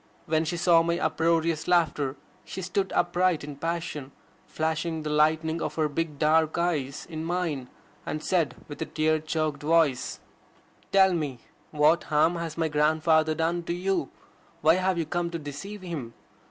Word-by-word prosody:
When 160 +1 +1
she 175 +2 -2
saw 170 -1 +5
my 170 +1 0
uproarious 165 -2 +1
laughter 155 -6 +2 0.3
she 190 - -7
stood 190 +2 -1
upright 175 -2 +2
in 145 -1 -7
passion, 165 -4 -4 0.4
flashing 160 0 -2
the 150 - -3
lightning 160 +2 +2
of - - -3
her 155 -1 +1
big 150 0 -3
dark 160 +1 +3
eyes 155 -6 -1
in 160 -2 -5
mine, 165 -7 -2 0.3
and 155 +1 -4
said 170 -6 +1
with 145 - -9
a 160 - -2
tear 155 0 +1
choked 155 -1 -2
voice: 155 -4 +2 0.7
"Tell 190 -1 +5
me! 145 -8 -3 0.3
What 155 +3 +3
harm 160 +3 +2
has 165 -2 -5
my 165 -1 +1
grandfather 155 +1 +2
done 165 +2 0
to 170 - -1
you? 180 -4 -1 0.5
Why 155 +2 +6
have 185 -1 +1
you 165 - 0
come 175 +2 -2
to 170 - -4
deceive 165 +7 -7
him? 145 -10 -6
160 Hz, 165 wpm, -27 LUFS, 150-170 Hz, 0.7 s, Why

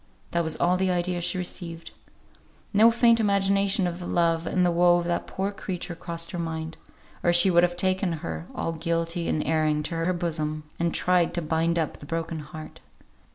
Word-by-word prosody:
That 170 0 +1
was 160 -1 -2
all 180 +1 +2
the 190 0 +1
idea 175 0 0
she 185 - 0
received. 170 -2 -5 0.8
No 215 +3 +7
faint 230 0 +4
imagination 200 -1 +2
of 175 0 -3
the 175 - -6
love 165 -1 +1
and 180 -1 +2
the 175 - +3
woe 175 +1 +4
of 175 - -2
that 175 0 -2
poor 195 +1 -2
creature 185 -3 -5
crossed 170 0 -5
her 175 - -4
mind, 160 -1 -4 0.5
or 175 - +3
she 175 +2 +5
would 170 0 +5
have 175 0 +1
taken 185 0 +1
her, 85 - -5
all - - -2
guilty 165 +1 -2
and 155 - 0
erring, 155 -1 +1
to 170 - -4
her 165 +2 0
bosom, 155 -3 -2 0.2
and 170 0 +1
tried 180 -1 +1
to 175 - -1
bind 165 +2 0
up 160 -3 -2
the 145 - -11
broken 165 0 -3
heart. 155 +1 -10
170 Hz, 200 wpm, -26 LUFS, 165-180 Hz, 0.8 s, No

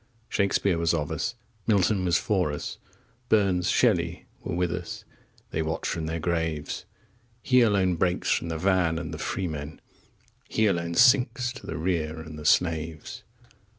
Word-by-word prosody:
Shakespeare 100 -3 +1
was 85 0 +2
of 75 0 -2
us, 80 +10 -2 0.3
Milton 100 -2 +3
was 85 -3 +3
for 90 -4 +1
us, 75 - -5 0.5
Burns, 95 -5 +3
Shelley, - - +2 0.2
were - - -3
with 90 -1 0
us 90 -1 -6 0.5
they 80 - -1
watch 80 +1 -2
from 80 -1 -2
their 80 +1 -2
graves! 80 -2 -2 0.6
He 125 -1 +5
alone 95 -6 +3
breaks 90 +1 +1
from 85 - 0
the 80 - -2
van 90 -2 +2
and 80 -1 -5
the 75 - -6
freemen, 80 -5 -4 0.7
15 - - -13
He 110 - +4
alone 85 -4 0
sinks 125 +1 +4
to 130 - -11
the - - -4
rear 80 -2 -1
and 80 -1 -8
the 75 - -9
slaves! 80 -1 0
85 Hz, 160 wpm, -27 LUFS, 80-95 Hz, 0.7 s, He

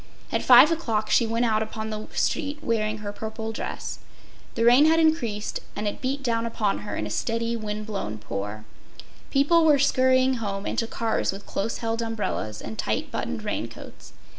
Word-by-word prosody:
At - - +1
five 255 +5 +8
o’clock 225 -10 -1
she 235 - +4
went 230 +2 +1
out 220 -2 +2
upon 220 0 -4
the 215 0 -5
street 295 -1 0
wearing 220 -3 0
her 205 - -2
purple 220 +1 -5
dress. 225 - -5 0.6
The 230 - +1
rain 245 +5 +7
had 325 +1 +4
increased, 240 -11 +1 0.2
and 210 0 -2
it 205 - -4
beat 275 +2 -2
down 230 -2 0
upon 215 -3 -1
her 105 -1 -5
in 105 - -2
a 105 - -5
steady, 230 - -1
wind 215 -1 -4
blown 195 - -4
pour. 105 +1 -5 0.6
People 300 +5 +4
were 305 -2 +6
scurrying 260 -1 +3
home 200 -3 -4
and - - -1
to 230 - -1
cars 230 -1 0
with 195 +1 -9
close 220 +4 -2
held 225 0 -2
umbrellas 210 - -3
and 110 - -7
tight - - -1
buttoned 80 - -3
raincoats. - - -6
225 Hz, 185 wpm, -25 LUFS, 210-255 Hz, 0.6 s, five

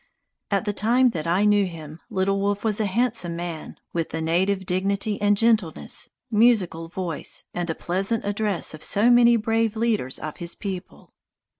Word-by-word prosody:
At 200 +2 0
the 205 - -1
time 245 +5 +3
that 165 -5 -4
I 185 +5 +2
knew 205 -2 +3
him, 160 -2 -9
Little 195 -2 0
Wolf 205 0 -1
was 215 -2 +1
a 210 - +1
handsome 210 -4 0
man, 170 -2 -6
with 165 -1 -2
the 160 - -4
native 190 +4 0
dignity 200 +3 -1
and 205 0 +3
gentleness, 220 -7 +1 0.2
musical 210 -7 +2
voice, 170 -2 -2
and 175 -1 -2
pleasant 195 +6 0
address 205 -4 -1
of 155 - -10
so 220 +5 +4
many 240 -1 +6
brave 225 0 0
leaders 220 - 0
of 155 - -7
his 170 0 -4
people. 190 -2 -7
200 Hz, 165 wpm, -24 LUFS, 175-220 Hz, 0.2 s, many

